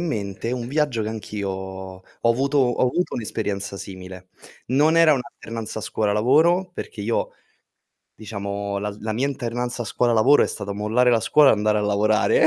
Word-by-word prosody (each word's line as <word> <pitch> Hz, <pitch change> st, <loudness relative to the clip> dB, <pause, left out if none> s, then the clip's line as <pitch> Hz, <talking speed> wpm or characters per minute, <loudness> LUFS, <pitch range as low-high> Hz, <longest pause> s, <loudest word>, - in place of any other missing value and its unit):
mente 110 Hz, -, -3 dB
un 120 Hz, -2 st, -3 dB
viaggio 145 Hz, -5 st, 0 dB
che 105 Hz, -, -3 dB
anch'io 105 Hz, -2 st, -5 dB
ho 95 Hz, 0 st, -7 dB, 0.2 s
avuto 135 Hz, +5 st, +2 dB
ho 125 Hz, -3 st, +2 dB
avuto 175 Hz, +8 st, -1 dB
un'esperienza 100 Hz, -3 st, -3 dB
simile. 95 Hz, -1 st, -10 dB, 0.4 s
Non 150 Hz, +6 st, +3 dB
era 165 Hz, -2 st, +6 dB
un' 130 Hz, -, -1 dB
alternanza 115 Hz, -2 st, -7 dB
scuola-lavoro, 140 Hz, -, +2 dB
perché 110 Hz, -, -7 dB
io 115 Hz, +3 st, -1 dB, 0.8 s
diciamo, 100 Hz, -1 st, -4 dB
la 105 Hz, +1 st, -3 dB
z 100 Hz, -, -14 dB
la 110 Hz, 0 st, -3 dB
mia 125 Hz, +5 st, 0 dB
alternanza 120 Hz, -2 st, -3 dB
scuola-lavoro 120 Hz, +4 st, +3 dB
è -, -, 0 dB
stata 100 Hz, -, -5 dB
mollare 110 Hz, +5 st, +2 dB
la 115 Hz, -2 st, +3 dB
scuola 145 Hz, +4 st, +5 dB
e -, -, +6 dB
andare 105 Hz, 0 st, +1 dB
a -, -, -1 dB
lavorare, 105 Hz, +1 st, +3 dB
110 Hz, 165 wpm, -23 LUFS, 100-125 Hz, 0.8 s, era